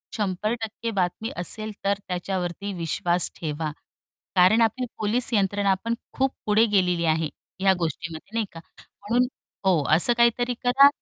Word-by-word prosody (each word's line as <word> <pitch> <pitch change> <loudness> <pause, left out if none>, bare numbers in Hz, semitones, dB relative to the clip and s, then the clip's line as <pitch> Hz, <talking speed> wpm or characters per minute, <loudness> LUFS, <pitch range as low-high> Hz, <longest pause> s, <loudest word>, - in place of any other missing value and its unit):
100% 220 +3 -2
बातमी 195 +3 -1
असेल, 215 +5 -2
तर 200 0 +1
त्याच्यावरती 185 +1 -3
विश्वास 175 +1 0
ठेवा. 155 -1 -3 0.6
कारण 185 +5 +5
आपली 230 +3 +1
पोलीस 230 +5 0
यंत्रणा 200 -1 +2
पण 230 0 0 0.2
खूप 265 0 +2
पुढे 215 +2 +4
गेलेली 180 -5 +2
आहे 160 -1 +1 0.3
ह्या 195 0 +5
गोष्टीमध्ये 165 +3 -4
नाही 225 -2 +1
का, 165 - -10 0.2
म्हणून 240 +5 -1 0.4
हो 175 -6 +3
असं 235 +8 +5
काहीतरी 240 +1 +3
करा 265 +3 +7
200 Hz, 135 wpm, -25 LUFS, 175-225 Hz, 0.6 s, करा